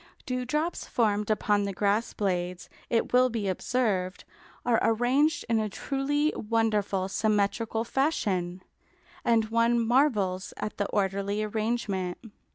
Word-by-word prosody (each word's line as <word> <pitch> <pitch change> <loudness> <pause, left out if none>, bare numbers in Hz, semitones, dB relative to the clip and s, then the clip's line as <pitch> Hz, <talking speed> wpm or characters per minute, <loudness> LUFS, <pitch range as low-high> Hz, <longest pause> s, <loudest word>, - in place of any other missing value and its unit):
Dewdrops 280 +5 -2
formed 210 -3 +1
upon 210 -1 +2
the 200 - -3
grass 205 +4 +1
blades, 180 -3 -2 0.2
it 230 +1 0
will 255 +1 +5
be 220 -4 -2
observed, 190 -2 -1 0.4
are 235 -2 +3
arranged 250 +7 +2
in 230 -2 +2
a 215 -1 -1
truly 285 +7 0
wonderful 210 -4 0
symmetrical 215 +2 0
fashion, 190 - -1 0.6
and 225 -2 +2
one 230 +1 +3
marvels 225 -7 +1
at 210 - -4
the 200 - 0
orderly 200 +1 -1
arrangement. 215 -4 -2
220 Hz, 120 wpm, -28 LUFS, 200-240 Hz, 0.6 s, will